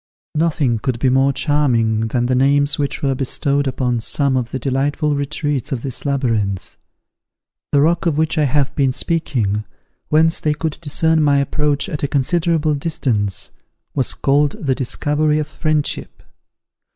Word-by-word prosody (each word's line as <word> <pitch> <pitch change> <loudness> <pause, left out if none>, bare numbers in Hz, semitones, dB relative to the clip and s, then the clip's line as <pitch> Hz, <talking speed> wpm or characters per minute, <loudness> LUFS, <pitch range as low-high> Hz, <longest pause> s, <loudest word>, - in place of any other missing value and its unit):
Nothing 150 -7 +1
could 125 +1 -2
be 130 +2 +1
more 135 +1 +3
charming 120 -7 +1
than 120 +1 0
the 130 - +1
names 140 +2 +2
which 140 0 -2
were 135 -1 +2
bestowed 140 +2 0
upon 125 -2 -1
some 140 +4 +1
of 125 -2 -1
the 130 - -3
delightful 140 +4 0
retreats 145 -1 -2
of 125 -4 -3
this 135 +1 -4
labyrinth. 110 -10 -1 1.0
The 140 - +4
rock 170 +3 +2
of 155 -3 +1
which 160 +1 +1
I 150 - +3
have 140 +1 0
been 135 -3 +2
speaking, 120 -11 -1 0.5
whence 160 +2 +3
they 150 -1 0
could 160 0 -3
discern 160 +1 +1
my 145 -2 +3
approach 145 +2 0
at 155 -7 -4
a 145 - 0
considerable 155 +2 +1
distance, 125 - -1 0.4
was 130 -3 -1
called 145 +1 +2
the 135 -3 -1
Discovery 150 +4 0
of 155 -1 -1
Friendship. 155 -1 -2
140 Hz, 155 wpm, -19 LUFS, 130-150 Hz, 1.0 s, The